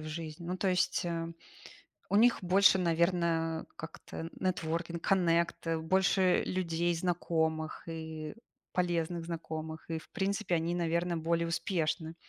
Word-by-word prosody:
в 155 - -7
жизни. 155 +1 -6
Ну, 180 +2 -2
то 195 - -1
есть, 180 -1 +1
э, 165 -1 -2 0.8
у - - +1
них 235 +3 +6
больше, 190 +2 +5
наверное, 170 -1 +1
как-то 165 0 -7
networking, 170 -2 -1
connect, 170 -3 +2
больше 190 +1 +3
людей 175 -1 0
знакомых 160 -2 -1
и 160 -1 -5 0.4
полезных 175 -1 0
знакомых. 160 -1 -5
И 160 -1 -2
в - - -17
принципе, 200 -2 0
они, 165 +1 0
наверное, 170 0 0
более 170 +1 +1
успешны, 165 -2 -1
170 Hz, 125 wpm, -32 LUFS, 160-180 Hz, 0.8 s, них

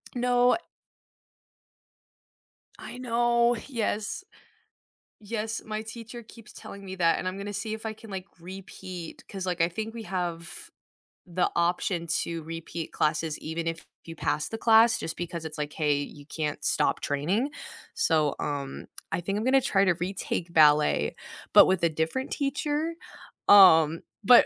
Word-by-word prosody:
No 245 0 +3 2.2
I - - -8
know, 240 -1 +2
yes. 220 - -2 1.0
Yes, 220 +1 -3
my 215 0 -3
teacher 230 +2 -8
keeps 230 0 -14
telling 200 0 -10
me 190 0 -6
that, 165 -2 +3
and - - -3
I'm 185 +1 -3
gonna 205 +1 -5
see 215 +2 -3
if 220 +1 -7
I 220 - -2
can, 220 0 -14
like, 190 -1 -6
repeat 185 -1 -9
'cause, 190 -2 -5
like, 180 -2 -1
I 165 - +3
think 220 +5 -5
we 230 -1 -7
have 175 -4 -4 0.6
the 180 0 0
option 170 0 0
to 165 0 -1
repeat 165 0 -6
classes 155 0 0
even 165 +1 -4
if 165 0 -4 0.2
you 165 0 -8
pass 155 - -1
the 225 - -4
class 225 0 +5
just 160 - -4
because 170 -2 -5
it's, 155 0 -6
like, 150 0 -3
hey, 150 -2 +1
you 145 0 -7
can't 150 -1 -4
stop - - +2
training. 185 - 0 0.4
So, 155 - +2
um, 140 -2 -4 0.2
I - - -1
think 195 +3 -2
I'm 220 - -2
gonna 270 +1 +5
try 200 -6 +3
to 185 - +4
retake 180 -1 -3
ballet, 150 -2 +4 0.4
but - - +10
with 185 -2 +1
a 170 - +5
different 160 - -2
teacher. 295 +3 -1 0.5
Um, 165 -5 +8 0.2
but 245 +3 +8
185 Hz, 155 wpm, -27 LUFS, 165-225 Hz, 2.2 s, but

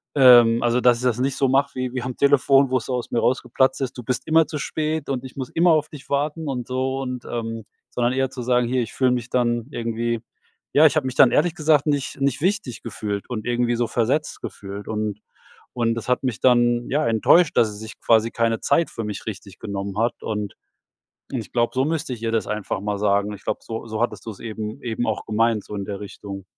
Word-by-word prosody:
Ähm, 120 -4 +7
also, 120 +1 +2
dass 120 -1 +5
ich 125 - -7
das 125 -1 +1
nicht 135 +1 0
so 135 - +2
mache 140 +2 +2
wie 130 -1 -3
wie 130 - -2
am 125 0 -5
Telefon, 140 -1 +4
wo 130 - +3
es 120 - -6
aus 125 -2 -3
mir 120 - +1
rausgeplatzt 130 +2 +1
ist: 130 -1 -3
„Du 125 - -6
bist 125 +2 -2
immer 160 0 +4
zu 150 - -4
spät 155 +1 -2
und 130 -1 -2
ich 130 - -10
muss 130 -2 -5
immer 170 +1 +3
auf 155 -1 +2
dich 145 -3 -12
warten" 150 +2 -1
und 125 -3 -3
so 130 +1 -1
und, 125 -2 -5
ähm 115 -1 -4 0.3
sondern 120 0 0
eher 135 0 0
zu 130 -1 -7
sagen: 125 -1 +2
„Hier, 125 +1 +1
ich 110 - -8
fühle 130 -2 +2
mich 125 -1 -2
dann 120 -1 0
irgendwie“ 115 0 -2 0.5
Ja, 150 +2 +6
ich 150 - +5
habe - - +1
mich 130 - -4
dann, 130 -4 +6
ehrlich 165 +2 +2
gesagt, 155 -2 +3
nicht 145 -2 -1
nicht 140 -1 +1
wichtig 170 - -1
gefühlt 105 -2 -4
und 110 -4 -4
irgendwie 120 0 +1
so 120 -1 0
versetzt 125 +7 -1
gefühlt 100 0 -7
und 105 -1 -3 0.5
und 115 -2 +1
das 115 - -6
hat 125 - +1
mich 125 -5 -2
dann, 120 -1 +3
ja, 150 +1 +1
enttäuscht, 145 +9 +4
dass 110 - +4
sie 105 - -9
sich 110 +1 -10
quasi 115 0 +3
keine 115 -1 0
Zeit 170 - +2
für 115 - -5
mich 105 -2 -5
richtig 100 -2 -7
genommen 100 0 -5
hat 115 +1 0
und 105 -2 -3 0.8
und 130 - -1
ich 110 - -11
glaube, 120 -1 +1
so 130 +1 +2
müsste 160 -4 -2
ich 115 -2 -7
ihr 115 0 -1
das 115 - 0
einfach 105 -2 -3
mal 105 0 -2
sagen. 100 0 +1
Ich 100 - -13
glaube, - - -2
so, 115 0 -6
so 110 -1 -4
hattest 115 -2 -2
du 115 - -3
es 100 - -11
eben 110 +2 -6
eben 120 0 -2
auch 110 - -2
gemeint, 110 -1 +1
so 105 - -9
in 100 -1 -3
der 100 -1 -5
Richtung. 100 -1 -8
120 Hz, 240 wpm, -23 LUFS, 110-135 Hz, 0.8 s, Ähm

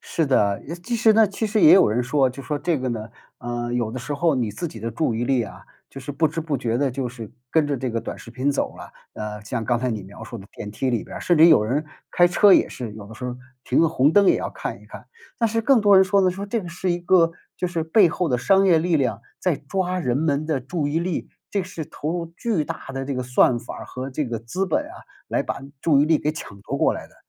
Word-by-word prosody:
是 160 - -1
的， 100 -7 +2
也 165 - -5
其 230 +8 -4
实 225 -1 +5
呢， 220 0 +5
其 205 +3 -3
实 215 0 +1
也 155 - +8
有 190 - +6
人 115 +4 0
说， 130 +2 +2
就 130 +2 -8
说 145 +2 -3
这 165 -1 0
个 130 0 -2
呢， 110 -2 -4 0.3
呃， 120 0 -4
有 120 -3 -1
的 130 - -5
时 145 +4 -5
候 165 +3 +2
你 120 -4 -1
自 105 - -4
己 115 -9 -9
的 115 - -3
注 120 +1 -1
意 115 +2 -1
力 130 -2 +2
啊， - - -9 0.3
就 135 - -10
是 135 +2 -6
不 150 +3 +2
知 160 +2 -3
不 155 -3 -2
觉 115 -2 -1
地 140 +1 +1
就 125 0 -3
是 115 -3 -9 0.2
跟 160 -2 +3
着 145 -1 -1
这 130 0 -3
个 115 -1 -2
短 - - -7
视 - - -12
频 130 +3 0
走 140 - -2
了。 - - -10 0.2
呃， 105 0 -5
像 115 +1 -3
刚 120 +1 +1
才 125 +1 -1
你 110 -3 -3
描 100 +4 -11
述 120 +1 -8
的 100 -2 -11
电 105 -2 -7
梯 130 +5 -2
里 120 -3 -1
边 - - -9
儿， - - -6
甚 175 -3 +2
至 160 - +9
有 155 -10 +6
人 140 +8 -1 0.3
开 175 - +5
车 195 +3 +5
也 - - +5
是， 120 -4 -7
有 100 -2 -10
的 110 - -11
时 125 - -8
候 125 0 -4 0.3
停 125 - +1
个 165 - +4
红 150 -1 +3
灯 205 -1 +5
也 - - +5
要 - - -4
看 - - -6
一 - - -17
看。 - - -11 0.3
但 230 - +3
是 225 +1 0
更 260 -2 +4
多 205 -1 +5
人 190 - +7
说 195 +1 +3
的 185 -1 +3
说 195 +2 -6
这 225 +2 -1
个 175 - -8
是 180 +2 -2
一 175 - 0
个， 175 -1 +4 0.3
就 180 - -2
是 165 -2 -2
背 175 +2 +5
后 180 +1 -1
的 125 - +2
商 195 +9 +4
业 175 -4 +5
力 165 0 +1
量， 115 -5 -1 0.2
在 180 - +1
抓 185 +5 -2
人 125 -4 0
们 150 -1 0
的 155 -4 0
注 145 +3 -2
意 155 +3 0
力， 175 0 -3 0.2
这 200 -2 -1
是 170 -3 -6
投 150 - -5
入 170 -1 -2
巨 215 -10 0
大 - - -7
的 135 0 -4
这 140 0 -3
个 125 - -2
算 125 0 +3
法 120 - -8
儿 - - -9
和 130 +2 -6
这 145 +2 -2
个 115 -2 -4
资 180 +13 -3
本 165 - +1
啊， - - -11 0.3
来 - - 0
把 - - -4 0.2
注 145 -4 +4
意 - - +5
力 155 0 +3
给 150 +1 -1
抢 100 -10 -9
夺 - - -4
过 - - +3
来 - - -7
的， - - -25
145 Hz, 310 characters per minute, -23 LUFS, 120-175 Hz, 0.3 s, 至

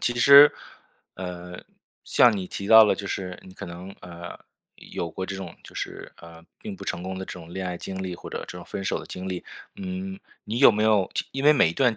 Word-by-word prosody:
其 120 - 0
实， 140 +3 +9 0.6
呃， 90 -1 -7 0.4
像 120 -3 +5
你 95 -2 -4
提 100 - -6
到 110 0 +9
了， - - +3
就 100 - -7
是 90 -2 -4
你 95 - -13
可 100 +1 -8
能， 90 +3 -9
呃， 85 0 -9 0.4
有 85 - -6
过 95 - -5
这 95 - -5
种 95 -3 -7
就 - - -14
是， - - -6
呃， 85 0 -14 0.2
并 210 -1 -7
不 - - -10
成 85 - -3
功 95 +1 -5
的 95 - -5
这 - - -7
种 85 -2 -11
恋 95 0 -4
爱 90 - -3
经 95 +2 -6
历 90 -1 -4
或 - - -10
者 - - -4
这 - - -8
种 - - -9
分 95 - -6
手 - - -1
的 - - -9
经 95 +1 -6
历。 90 -1 -5 0.3
嗯， 190 0 -5 0.3
你 115 +3 -3
有 135 -4 +8
没 105 +1 0
有， 105 -4 +3
就 - - -2
因 135 +1 -3
为 150 - +8
每 130 - +4
一 - - -3
段 120 +1 +2
95 Hz, 260 characters per minute, -25 LUFS, 90-120 Hz, 0.6 s, 实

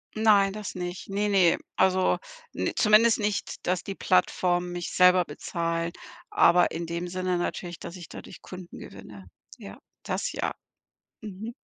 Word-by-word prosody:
Nein, 205 -3 +4
das 210 -2 -6
nicht. 180 0 -6
Ne, 205 +1 0
ne. 185 -4 +4 0.2
Also 185 0 +3 0.4
n - - -1
zumindest 220 +1 +5
nicht, 205 -1 -3
dass 180 0 0
die 195 - -5
Plattformen 180 -1 +1
mich 175 -1 -5
selber 180 0 +5
bezahlen, 170 -1 -3 0.4
aber 175 +1 +5
in 165 0 -4
dem 170 +1 -3
Sinne 185 0 -1
natürlich, 175 0 -4
dass 170 - -8
ich 175 -3 -10
dadurch - - -11
Kunden 185 -1 -10
gewinne. 100 0 -11 0.3
Ja, - - -10 0.3
das - - -2
ja. - - -2 0.7
Mhm. 215 +3 -7
180 Hz, 150 wpm, -27 LUFS, 175-200 Hz, 0.7 s, zumindest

